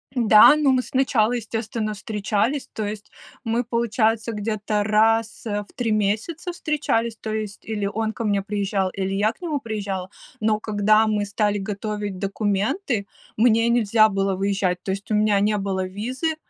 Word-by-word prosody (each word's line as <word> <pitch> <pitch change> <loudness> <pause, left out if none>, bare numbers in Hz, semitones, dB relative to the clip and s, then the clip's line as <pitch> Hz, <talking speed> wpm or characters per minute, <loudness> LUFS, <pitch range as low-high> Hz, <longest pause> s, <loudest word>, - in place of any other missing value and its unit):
Да, 220 +2 +7
ну 295 -3 +3
мы 255 -1 +3
сначала, 245 -4 +1
естественно, 225 -2 -3
встречались, 215 +6 -2
то 215 - -3
есть 210 0 -6 0.3
мы, 230 +2 0
получается, 230 -1 0
где-то 210 0 -2
раз, 220 +2 +2
э, 205 -2 -2
в - - -22
три 235 -3 -1
месяца 220 - -1
встречались. 255 -9 -1
То 220 -1 -5
есть 215 -2 -5
или 215 -2 -3
он 220 +2 -2
ко 230 - -5
мне 205 -2 +1
приезжал, 200 -1 -1
или 195 0 -3
я 210 +3 +1
к - - -33
нему 310 -5 -2
приезжала. 200 -5 -4 0.3
Но 215 -1 +1
когда 215 +1 +3
мы 210 -1 0
стали 205 0 0
готовить 205 -1 -4
документы, 205 - -1 0.3
мне 230 0 +3
нельзя 220 -2 +4
было 195 -2 0
выезжать, 190 -2 0
то 190 - -2
есть 200 +3 -5
у - - +2
меня 210 -1 +3
не 210 +1 +2
было 195 -1 -2
визы, 250 - -3
215 Hz, 165 wpm, -23 LUFS, 205-230 Hz, 0.3 s, Да